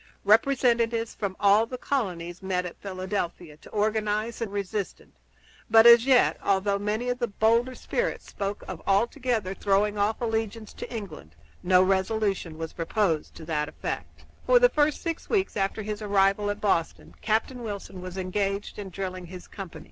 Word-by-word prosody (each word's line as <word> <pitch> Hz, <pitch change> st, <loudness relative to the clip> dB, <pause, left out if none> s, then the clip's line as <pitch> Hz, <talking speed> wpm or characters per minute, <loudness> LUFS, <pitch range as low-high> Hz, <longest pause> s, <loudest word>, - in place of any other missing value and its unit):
Representatives 230 Hz, 0 st, +3 dB
from 200 Hz, -3 st, -4 dB
all 205 Hz, +3 st, +5 dB
the 255 Hz, -, -6 dB
colonies 180 Hz, -10 st, -3 dB
met 185 Hz, -1 st, -1 dB
at 180 Hz, -, -8 dB
Philadelphia 185 Hz, -4 st, -4 dB
to -, -, -15 dB
organize 215 Hz, +1 st, -1 dB
the 230 Hz, -, -1 dB
national 205 Hz, -1 st, -9 dB
resistance; 200 Hz, 0 st, -4 dB, 0.5 s
but 225 Hz, +1 st, +7 dB
as 235 Hz, +1 st, +8 dB
yet, 255 Hz, -2 st, +4 dB
although 200 Hz, 0 st, +1 dB
many 215 Hz, +4 st, -2 dB
of 245 Hz, 0 st, -1 dB
the 240 Hz, -, 0 dB
bolder 230 Hz, +4 st, +2 dB
spirits 485 Hz, -, -2 dB
spoke 200 Hz, 0 st, -4 dB
of -, -, -6 dB
altogether 225 Hz, -1 st, +1 dB
throwing 205 Hz, +1 st, +1 dB
off 210 Hz, +2 st, +1 dB
allegiance 225 Hz, -2 st, -3 dB
to -, -, -8 dB
England, 170 Hz, -, -8 dB, 0.3 s
no 180 Hz, 0 st, +5 dB
resolution 190 Hz, -3 st, 0 dB
was 160 Hz, 0 st, -5 dB
proposed 165 Hz, -2 st, -1 dB
to 160 Hz, -, -10 dB
that 150 Hz, -2 st, -1 dB
effect. -, -, -6 dB, 0.2 s
For -, -, +7 dB
the -, -, +6 dB
first 300 Hz, -, +1 dB
six 330 Hz, -1 st, -4 dB
weeks 390 Hz, -3 st, +1 dB
after 200 Hz, +1 st, -1 dB
his 210 Hz, +1 st, -4 dB
arrival 200 Hz, 0 st, +2 dB
at 205 Hz, 0 st, -3 dB
Boston, 170 Hz, -6 st, -1 dB
Captain 225 Hz, +3 st, 0 dB
Wilson 200 Hz, -4 st, -6 dB
was 185 Hz, 0 st, -7 dB
engaged 195 Hz, +2 st, -2 dB
in 200 Hz, -2 st, -6 dB
drilling 185 Hz, -1 st, -5 dB
his 180 Hz, +1 st, -10 dB
company. 195 Hz, -4 st, -8 dB
205 Hz, 165 wpm, -26 LUFS, 190-225 Hz, 0.5 s, as